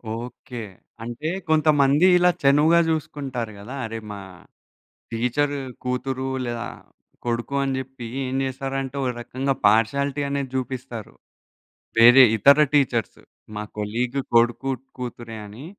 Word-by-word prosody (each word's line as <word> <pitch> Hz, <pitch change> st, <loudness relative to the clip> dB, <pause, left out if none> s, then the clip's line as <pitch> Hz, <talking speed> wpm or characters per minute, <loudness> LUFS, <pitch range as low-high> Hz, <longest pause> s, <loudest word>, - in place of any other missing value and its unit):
Okay. 120 Hz, 0 st, -7 dB, 0.4 s
అంటే 120 Hz, +7 st, -4 dB, 0.2 s
కొంతమంది 150 Hz, 0 st, +4 dB
ఇలా 180 Hz, 0 st, +5 dB
చనువుగా 150 Hz, +5 st, +5 dB
చూసుకుంటారు 135 Hz, -7 st, -3 dB
గదా! 115 Hz, +7 st, -8 dB
అరే! 115 Hz, 0 st, -5 dB
మా 100 Hz, -, -6 dB, 0.9 s
టీచ్చరు 140 Hz, +5 st, 0 dB, 0.3 s
కూతురు 130 Hz, +1 st, -2 dB, 0.2 s
లేదా, 120 Hz, 0 st, -3 dB, 0.6 s
కొడుకు 120 Hz, +3 st, -2 dB
అని 135 Hz, -1 st, -1 dB
చెప్పి 130 Hz, -2 st, -7 dB, 0.2 s
ఏం 130 Hz, 0 st, -3 dB
చేస్తారంటే 135 Hz, 0 st, -4 dB
ఓ -, -, 0 dB
రకంగా 130 Hz, +3 st, -2 dB
పార్షియాలిటీ 140 Hz, +7 st, +2 dB
అనేది 140 Hz, -2 st, -2 dB
జూపిస్తారు. 125 Hz, -4 st, -5 dB, 0.9 s
వేరే 120 Hz, +3 st, +9 dB
ఇతర 140 Hz, +6 st, +6 dB, 0.2 s
టీచర్సు 130 Hz, -5 st, +1 dB, 0.3 s
మా 105 Hz, -, -3 dB
కొలీగ్ 120 Hz, +6 st, -2 dB, 0.2 s
కొడుకు 120 Hz, +3 st, +3 dB, 0.3 s
కూతురే 120 Hz, -2 st, -6 dB
అని. 110 Hz, +8 st, -10 dB
130 Hz, 115 wpm, -23 LUFS, 120-140 Hz, 0.9 s, వేరే